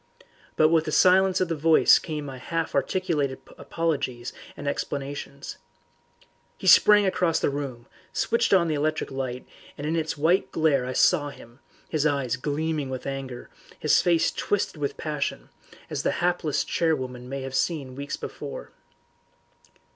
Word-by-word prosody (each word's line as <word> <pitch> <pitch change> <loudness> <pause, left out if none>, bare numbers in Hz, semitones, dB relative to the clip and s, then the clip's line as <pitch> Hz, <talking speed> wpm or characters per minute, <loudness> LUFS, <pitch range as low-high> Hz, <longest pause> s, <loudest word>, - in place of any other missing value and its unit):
But 155 - +5
with 160 -1 +3
the 155 - -3
silence 185 +2 +4
of 185 - +2
the 165 - -1
voice 160 +1 +5
came 150 -3 -5
my 135 -2 -7
half 165 +4 -3
articulated 145 -3 0 0.2
apologies 140 -7 -3 0.2
and 145 - -6
explanations. 140 0 -4 1.0
He - - -9
sprang 210 -1 +7
across 180 -3 +1
the - - +1
room, 135 -4 -5 0.3
switched 230 0 +1
on 180 -3 +5
the 160 - 0
electric 155 +1 -1
light, 130 -2 -4 0.3
and 145 - -5
in 160 +2 0
its 160 -2 -2
white 170 +6 +2
glare 145 -6 +2
I 130 - -3
saw 145 +1 +3
him, 120 -2 -14 0.3
his 155 -1 +1
eyes 140 -4 0
gleaming 150 +1 -2
with 130 -1 -5
anger, 135 -2 -6 0.3
his - - +3
face 170 -2 +2
twisted 205 -5 -1
with 140 - -2
passion, 145 - -3 0.4
as - - -3
the - - 0
hapless 175 -4 0
charwoman 130 -7 -2
may 135 0 -4
have 135 0 -6
seen 145 -1 -1
him 130 - -11
weeks 140 +1 -5
before. - - -7
150 Hz, 155 wpm, -25 LUFS, 135-165 Hz, 1.0 s, sprang